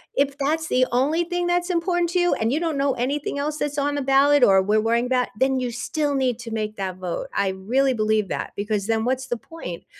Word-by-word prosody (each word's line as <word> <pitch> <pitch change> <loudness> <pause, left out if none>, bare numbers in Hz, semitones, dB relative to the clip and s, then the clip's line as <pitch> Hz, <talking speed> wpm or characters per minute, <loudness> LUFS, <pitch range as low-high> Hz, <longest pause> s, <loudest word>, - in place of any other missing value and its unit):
if 280 0 +1
that's 315 +3 -1
the 255 0 +3
only 295 +8 +2
thing 350 0 -2
that's 350 +1 0
important 350 0 +1
to 360 - +1
you, 350 0 +2
and 225 +1 0
you 305 - +1
don't 325 -4 -1
know 275 -1 +1
anything 280 +3 -2
else 300 +1 -2
that's 290 -1 -2
on 290 +1 0
the 285 - -1
ballot 275 +1 +4
or 195 -3 +6
we're 210 +3 +2
wearing 235 +3 +1
that, 250 -1 +1
then 265 0 +2
you 245 -1 -2
still 290 +5 -2
need 255 -4 0
to 235 -1 -8
make 215 -1 -3
that 190 -2 -4
vote. 180 -2 -4
I 200 -1 +1
really 250 +8 +1
believe 215 -1 +1
that, - - -4
because 205 -1 -2
then 225 0 0
what's 260 +1 -1
the 240 - -2
point? 225 - -9
265 Hz, 240 wpm, -23 LUFS, 220-295 Hz, -, or